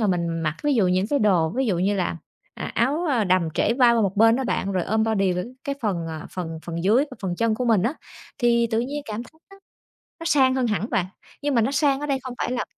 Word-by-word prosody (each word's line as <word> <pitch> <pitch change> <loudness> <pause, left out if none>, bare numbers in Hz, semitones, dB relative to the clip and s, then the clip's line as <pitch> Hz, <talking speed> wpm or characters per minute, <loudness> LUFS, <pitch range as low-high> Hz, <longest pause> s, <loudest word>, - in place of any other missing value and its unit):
mà 215 - +2
mình 175 -3 0
mặc, 155 0 -1
ví 295 -2 +2
dụ, 205 -6 +3
những 185 +2 +1
cái 285 +4 +1
đồ, 180 -7 +3
ví 265 -1 +1
dụ 185 -5 0
như 195 +3 +1
là, 175 -2 -1 0.4
à, - - -5
áo 300 +8 +1 0.2
đầm 180 -3 +3
trễ 230 - +2
vai 245 -2 +5
qua 230 - +2
một 195 0 -1
bên 225 +2 +5
đó 265 - -2
bạn, 195 -5 -1
rồi 185 -2 0
ôm 220 +2 +1
body 195 -4 +1
với 180 +3 -3 0.2
cái 280 - -2
phần, 180 -7 -1
à, 155 -1 -6
phần 165 -3 -5
phần 170 +1 -4
dưới 235 +8 +4
và - - -8
phần 175 -2 -2
chân 230 -1 +1
của 250 - -2
mình 225 -6 +3
á 240 +7 +1 0.5
thì 235 -2 +3
tự 225 +1 +1
nhiên 285 +4 -4
cảm 215 +2 -5
thấy - - -15 0.2
nó 390 - -15 0.6
nó - - -6
sang 265 -4 +4
hơn 255 -2 +1
hẳn 215 +1 -2
bạn. 180 - +1 0.4
Nhưng 290 -2 0
mà 230 - +4
nó 260 +5 0
sang 280 -1 +2
ở 295 - -3
đây 275 -2 0
không 255 -2 -6
phải 245 - -2
là 250 - -1
225 Hz, 270 wpm, -23 LUFS, 185-260 Hz, 0.6 s, vai